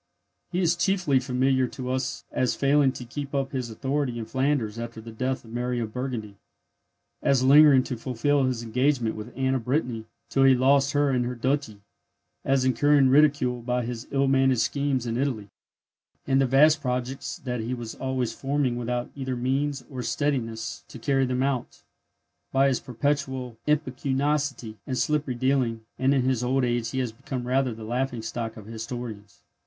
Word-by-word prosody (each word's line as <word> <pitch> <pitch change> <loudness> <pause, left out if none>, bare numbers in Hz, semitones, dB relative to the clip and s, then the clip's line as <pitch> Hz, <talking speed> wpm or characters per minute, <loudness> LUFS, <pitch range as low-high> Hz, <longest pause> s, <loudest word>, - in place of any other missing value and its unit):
He 180 +1 0
is 170 -1 +3
chiefly 175 -7 +2
familiar 130 0 +1
to 125 0 -5
us 130 0 -2
as 130 - 0
failing 140 -1 +3
to 125 - -8
keep 140 +3 -6
up 135 -1 -1
his 130 -3 -3
authority 135 +2 -2
in 115 - -4
Flanders 130 -3 0
after 115 -1 -6
the 115 +1 -9
death 130 +3 -2
of 115 - -13
Mary 125 0 -1
of 110 -2 -4
Burgundy, 120 -6 -4 0.8
as 135 -2 +3
lingering 140 -1 +7
to 125 - -4
fulfil 130 +4 +1
his 125 -3 -1
engagement 125 0 +1
with 110 +3 -7
Anne 130 0 +1
of 130 -4 -2
Brittany 125 -5 -1 0.2
till 135 - +2
he 135 -1 +7
lost 140 +2 +3
her 145 -1 +2
and 125 -2 +1
her 125 +1 -3
duchy, 125 -4 -1 0.6
as 135 -1 +2
incurring 135 +2 +4
ridicule 135 -3 +3
by 125 0 -1
his 120 0 -5
ill 140 0 +1
managed 135 -2 +3
schemes 135 +1 0
in 115 0 -2
Italy, 125 -7 -2 0.7
and 135 0 +3
the 135 - +3
vast 150 +4 +5
projects 125 0 -3
that 125 -2 -4
he 115 +3 -2
was 120 -2 -6
always 130 -3 -2
forming 135 -2 -1
without 120 0 -3
either 130 -2 -3
means 135 +3 -1
or 130 -3 -6
steadiness 120 -5 -2
to - - -10
carry 135 +2 +1
them 125 +1 0
out, 135 -3 -2 0.7
by 135 +1 +4
his 130 -2 +1
perpetual 130 -1 -2
impecuniosity 140 -4 -1
and 130 - -2
slippery 150 -3 0
dealing; 120 -3 0
and 135 +2 +3
in 130 - +2
his 130 -2 +1
old 130 +2 +1
age 120 -1 -1
he 130 - -5
has 125 -3 -1
become 125 +2 -6
rather 130 0 +1
the 110 - -9
laughing 120 +1 -2
stock 115 0 -4
of 105 - -10
historians. 115 -2 -7
130 Hz, 180 wpm, -26 LUFS, 120-135 Hz, 0.8 s, lingering